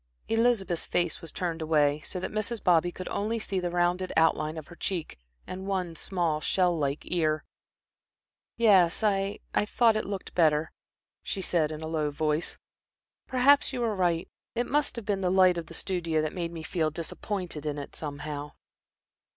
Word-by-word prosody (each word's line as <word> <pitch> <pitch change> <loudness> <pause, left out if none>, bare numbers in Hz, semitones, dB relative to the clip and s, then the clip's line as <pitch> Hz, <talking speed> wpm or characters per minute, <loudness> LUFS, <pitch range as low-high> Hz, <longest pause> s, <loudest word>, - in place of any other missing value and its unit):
Elizabeth's 225 -7 +1
face 175 - 0
was 165 - -7
turned 170 -2 -3
away, 150 -2 +3
so 180 +7 -4
that - - -4
Mrs. 215 +1 -3
Bobby 175 0 +4
could 185 +1 -7
only 220 +3 -1
see 200 -3 -2
the 180 -1 -1
rounded 175 +1 +1
outline 160 -1 +2
of 155 -2 -8
her 175 - -11
cheek 175 - -3 0.3
and 190 +1 -6
one 185 -4 -1
small, 165 -3 -1
shell 180 +2 +2
like 145 -2 -1
ear. 155 -3 0 1.1
"Yes, 195 -5 +5
I 200 -1 +1
I 210 - +2
thought 230 -1 +4
it 215 - -1
looked 195 -1 -5
better," 155 -2 +3 0.5
she 195 - -4
said, 160 -4 +2
in 155 0 -6
a 160 - -4
low 155 -2 0
voice. 150 +2 -1 0.7
"Perhaps 270 +2 +4
you 250 - -2
were 225 -3 0
right. 175 -3 +1 0.3
It 240 - +1
must 290 +1 +1
have 235 -3 -6
been 200 -1 0
the 185 - +1
the 180 - +2
light 185 -2 +6
of 165 - -8
the 165 - -6
studio 170 -4 -1
that 155 - -2
made 170 -2 -3
me 165 -2 -7
feel 160 -1 0
disappointed 170 0 -4
in 150 -1 -2
it, 145 - -7
somehow." 145 0 -5
175 Hz, 185 wpm, -28 LUFS, 155-195 Hz, 1.1 s, light